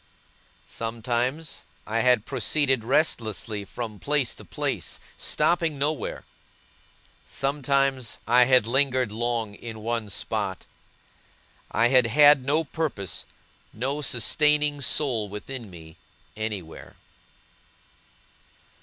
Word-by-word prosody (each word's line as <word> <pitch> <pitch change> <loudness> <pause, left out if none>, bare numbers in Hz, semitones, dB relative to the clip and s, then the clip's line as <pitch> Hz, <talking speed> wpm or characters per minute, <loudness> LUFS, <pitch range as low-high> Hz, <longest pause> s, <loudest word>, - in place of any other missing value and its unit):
Sometimes, 120 +6 -2 0.2
I 115 +2 -1
had 125 -3 +3
proceeded 135 -1 +1
restlessly 115 -6 0
from 110 -1 -6
place 145 -4 0
to - - -11
place, - - -3 0.2
stopping 165 -4 +1
nowhere; 145 +2 -2 1.0
sometimes, 135 -3 0
I 125 +1 +6
had 130 -3 +5
lingered 130 -1 +1
long 115 -1 -2
in 110 +1 -9
one 115 -2 -2
spot. - - -3 1.0
I 115 +1 +3
had 130 -2 +5
had 145 +2 +6
no 150 +5 +1
purpose, 140 - -3 0.5
no 135 +6 -2
sustaining 150 +3 +2
soul 120 -7 +1
within 110 +3 -7
me, 80 -3 -13 0.4
anywhere. 105 -7 -6
125 Hz, 95 wpm, -25 LUFS, 110-140 Hz, 1.0 s, I